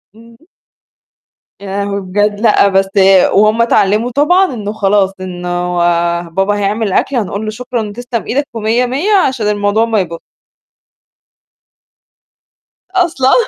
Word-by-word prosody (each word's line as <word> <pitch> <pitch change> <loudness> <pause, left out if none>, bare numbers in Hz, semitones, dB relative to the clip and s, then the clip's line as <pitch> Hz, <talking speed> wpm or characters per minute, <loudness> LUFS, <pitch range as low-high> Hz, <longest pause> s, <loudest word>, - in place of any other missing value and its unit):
إمم. 230 0 -17 1.2
يا 200 - -9 0.2
لهوي 200 0 -3
بجد! 205 +2 -1
لأ، 215 -3 +4
بس 195 0 +1 0.4
وهم 215 +3 +3
اتعلموا 225 +1 +1
طبعًا 300 +5 +2
إنه 210 -2 -5
خلاص، 195 -2 +1
إنه 180 -1 -4 0.6
بابا 195 +4 0
هيعمل 205 0 -1
أكل 275 - 0
هنقول 205 -2 -2
له - - -3
شكرًا 230 -2 -4
تسلم 240 -2 -5
إيدك 285 +4 -1
ومِيّة 225 +3 0
مِيّة 285 - -1 0.2
عشان 235 -5 -3
الموضوع 205 +2 +1
ما 225 -2 0
يبو 170 -2 -4 2.7
أصلًا. 330 -8 +1
215 Hz, 120 wpm, -13 LUFS, 200-245 Hz, 2.7 s, لأ